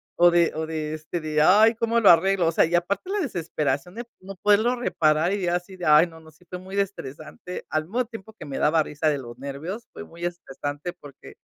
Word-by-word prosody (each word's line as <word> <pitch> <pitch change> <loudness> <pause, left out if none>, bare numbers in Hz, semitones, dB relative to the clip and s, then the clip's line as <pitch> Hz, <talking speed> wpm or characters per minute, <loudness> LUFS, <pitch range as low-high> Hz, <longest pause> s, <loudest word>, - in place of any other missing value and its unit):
o 175 0 +6
de 170 -1 +3
o 160 0 -2
de, 155 -1 -4
este, 160 +2 -5
de: 155 -1 -1
"Ay, 215 +7 +6
¿cómo 230 +1 +1
lo 215 - +6
arreglo?". 180 +1 +4
O - - +2
sea, - - +3
y 165 - -5
aparte 190 - 0
la 415 - 0
desesperación 165 - -2
de 240 - -5 0.2
no 195 +1 -9
poderlo 210 +6 +3
reparar 160 -7 +1
y 200 -3 -2
así 175 +2 -2
de: 180 - -6
"Ay", 150 +3 +6
no, 165 -1 -14
no, 160 -1 -16
sí 155 +4 -25
fue 180 - -5
muy 190 +2 -5
estresante. 180 -2 -6
Al 155 0 0
mismo 225 +10 -1
tiempo 220 -2 -11
que - - -11
me 140 - -5
daba 160 +2 +3
risa 150 0 -1
de 145 -2 -1
los 120 -2 -10
nervios, 145 - -6
fue - - -8
muy 170 -1 -8
estresante 145 -2 -5
porque, 140 -2 -13
175 Hz, 230 wpm, -24 LUFS, 155-195 Hz, 0.2 s, o